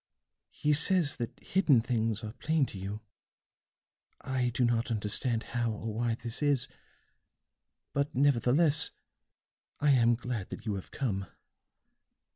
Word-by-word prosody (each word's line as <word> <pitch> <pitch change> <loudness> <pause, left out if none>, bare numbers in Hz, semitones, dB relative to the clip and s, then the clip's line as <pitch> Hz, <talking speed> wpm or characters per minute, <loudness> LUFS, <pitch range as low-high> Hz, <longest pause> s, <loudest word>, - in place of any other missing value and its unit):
"He 150 - 0
says 160 0 +4
that 120 -2 -5
hidden 170 -9 +3
things 115 -2 -1
are 110 0 -6
plain 155 +1 +1
to 100 - -8
you. 100 +3 -5 1.2
I 130 -2 -1
do 125 +1 +1
not 120 +1 0
understand 115 +2 0
how 120 -1 0
or 110 0 -4
why 115 +1 0
this 120 +1 -4
is, 140 -3 +2 1.3
but 140 0 -1
nevertheless 145 +3 +3 0.9
I 145 0 +3
am 120 -3 +4
glad 120 -5 -4
that - - -8
you 110 - -1
have 95 -2 -6
come. 100 -8 -2
120 Hz, 130 wpm, -30 LUFS, 110-140 Hz, 1.3 s, says